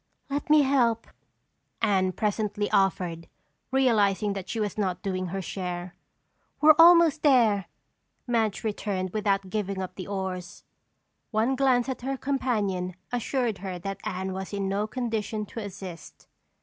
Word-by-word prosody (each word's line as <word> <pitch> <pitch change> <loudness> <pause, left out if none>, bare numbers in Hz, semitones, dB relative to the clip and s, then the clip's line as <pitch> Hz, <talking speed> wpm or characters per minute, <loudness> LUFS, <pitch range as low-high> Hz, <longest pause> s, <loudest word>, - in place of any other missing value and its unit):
"Let 285 +1 -2
me 300 -1 +6
help," 240 -4 +2 0.7
Anne 190 -4 +2
presently 210 0 -1
offered, 180 -3 +1 0.4
realizing 210 -6 +2
that 195 -2 -6
she 230 - -3
was 210 -3 -1
not 190 -4 -2
doing 185 -2 -2
her 190 +2 -4
share. 180 0 -5 0.7
"We're 310 0 +8
almost 335 -2 +7
there," 230 -9 +4 0.6
Madge 225 -5 0
returned 200 -4 -2
without 195 -2 0
giving 200 -2 -2
up 185 -1 -4
the 185 -1 -7
oars. 190 -2 -5 0.7
One 230 +4 +1
glance 255 -2 +3
at 260 -2 -4
her 270 +2 -2
companion 210 -10 -1 0.2
assured 245 -3 -1
her 185 -1 -5
that 195 +3 -5
Anne 190 +1 -3
was 190 +1 -6
in 200 -1 -1
no 200 +2 -1
condition 220 -3 -3
to 230 - -8
assist. 190 -5 -9
205 Hz, 140 wpm, -27 LUFS, 190-240 Hz, 0.7 s, We're